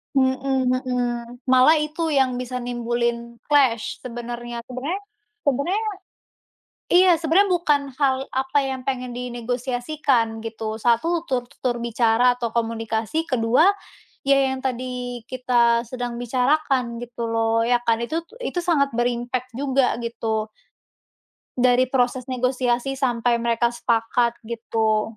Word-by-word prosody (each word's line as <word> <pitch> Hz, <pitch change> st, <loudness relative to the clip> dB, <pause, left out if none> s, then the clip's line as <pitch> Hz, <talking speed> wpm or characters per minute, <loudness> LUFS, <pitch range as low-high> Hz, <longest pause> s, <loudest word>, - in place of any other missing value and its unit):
Mhm 260 Hz, -1 st, +2 dB
mhm. 245 Hz, -1 st, -2 dB
Malah 260 Hz, +5 st, +7 dB
itu 320 Hz, +2 st, -3 dB
yang 265 Hz, -4 st, +2 dB
bisa 250 Hz, 0 st, -5 dB
nimbulin 235 Hz, -1 st, -2 dB, 0.2 s
clash 255 Hz, -6 st, +3 dB
sebenarnya. 240 Hz, -1 st, -6 dB
Sebenarnya 275 Hz, +10 st, -4 dB, 0.4 s
sebenarnya 300 Hz, -, 0 dB, 1.1 s
iya 365 Hz, 0 st, +7 dB
sebenarnya 345 Hz, +5 st, +3 dB
bukan 295 Hz, -4 st, +2 dB, 0.2 s
hal 270 Hz, -2 st, +3 dB
apa 265 Hz, +2 st, 0 dB
yang 265 Hz, -1 st, -3 dB
pengen 255 Hz, -2 st, -2 dB
dinegosiasikan 245 Hz, 0 st, -1 dB
gitu. 220 Hz, -1 st, -4 dB
Satu 325 Hz, +10 st, +1 dB
tur 255 Hz, -4 st, 0 dB
tutur 240 Hz, -2 st, -3 dB
bicara 235 Hz, +1 st, +3 dB
atau 235 Hz, -1 st, -3 dB
komunikasi. 225 Hz, +6 st, -1 dB
Kedua, 250 Hz, +6 st, +3 dB, 0.6 s
ya 275 Hz, 0 st, +4 dB, 0.2 s
yang 260 Hz, -, -7 dB
tadi 250 Hz, -2 st, -4 dB
kita 240 Hz, -2 st, +2 dB
sedang 245 Hz, -2 st, -4 dB
bicarakan 250 Hz, -1 st, +1 dB
gitu 235 Hz, -1 st, -5 dB
loh, 225 Hz, 0 st, +1 dB
ya 240 Hz, 0 st, +2 dB
kan? 230 Hz, -1 st, +2 dB
Itu 325 Hz, +4 st, -2 dB, 0.2 s
itu 360 Hz, -8 st, -3 dB
sangat 280 Hz, -7 st, +1 dB
ber-impact 245 Hz, +1 st, -2 dB
juga 270 Hz, -3 st, +1 dB
gitu. 225 Hz, -2 st, -2 dB, 1.1 s
Dari 250 Hz, 0 st, +3 dB
proses 255 Hz, 0 st, 0 dB
negosiasi 250 Hz, 0 st, 0 dB
sampai 240 Hz, -2 st, +1 dB
mereka 235 Hz, 0 st, +1 dB
sepakat 235 Hz, 0 st, +1 dB
gitu. 220 Hz, -1 st, -1 dB
245 Hz, 120 wpm, -23 LUFS, 235-265 Hz, 1.1 s, Malah